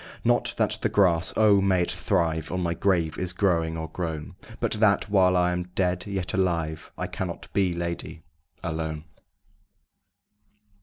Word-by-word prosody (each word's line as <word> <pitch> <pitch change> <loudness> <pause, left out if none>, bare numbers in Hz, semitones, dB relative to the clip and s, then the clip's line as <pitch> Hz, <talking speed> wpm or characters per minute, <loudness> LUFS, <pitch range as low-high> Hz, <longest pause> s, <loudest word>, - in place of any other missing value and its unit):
Not - - +1
that - - +1
the - - +1
grass 90 -4 +3
O! 105 -2 +5
may 95 -2 +3
it - - -2
thrive! 80 -5 0
On 90 - -1
my 85 -2 0
grave 85 -3 0
is 90 -1 -1
growing 85 -4 +1
or 80 0 -4
grown 80 -1 -5 0.3
But 115 - -1
that, 105 -1 +3
while 90 -2 +4
I 90 0 +3
am 90 0 -2
dead 90 -1 0
yet 95 -3 -3
alive 85 -4 -1
I - - -2
cannot - - -5
be, 95 -3 +2
lady, 85 -1 -5 0.4
alone. 80 -2 -3
90 Hz, 155 wpm, -26 LUFS, 80-95 Hz, 0.4 s, O